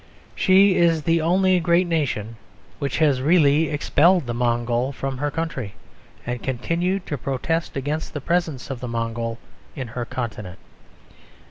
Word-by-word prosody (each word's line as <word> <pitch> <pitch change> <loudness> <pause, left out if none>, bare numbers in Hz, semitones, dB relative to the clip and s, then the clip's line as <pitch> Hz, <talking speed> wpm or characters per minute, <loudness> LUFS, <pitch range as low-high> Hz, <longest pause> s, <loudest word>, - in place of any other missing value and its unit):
She 190 0 +4
is 165 -2 +3
the 165 +1 +2
only 185 +3 +3
great 170 +2 +3
nation 125 -10 -2 0.4
which 140 -1 -2
has 145 -5 +3
really 155 0 +4
expelled 165 +3 +3
the 120 - -3
Mongol 120 +1 0
from 135 0 -4
her 145 +1 0
country, 140 -9 -4 0.5
and 125 0 -3
continued 170 +9 -1
to 145 -4 -4
protest 140 +6 -2
against 150 +4 -3
the - - -1
presence 160 -4 -1
of 130 - -5
the 125 - -5
Mongol 115 0 -3 0.4
in 130 -4 -5
her 120 +1 -4
continent. 105 -8 -5
140 Hz, 145 wpm, -23 LUFS, 120-165 Hz, 0.5 s, She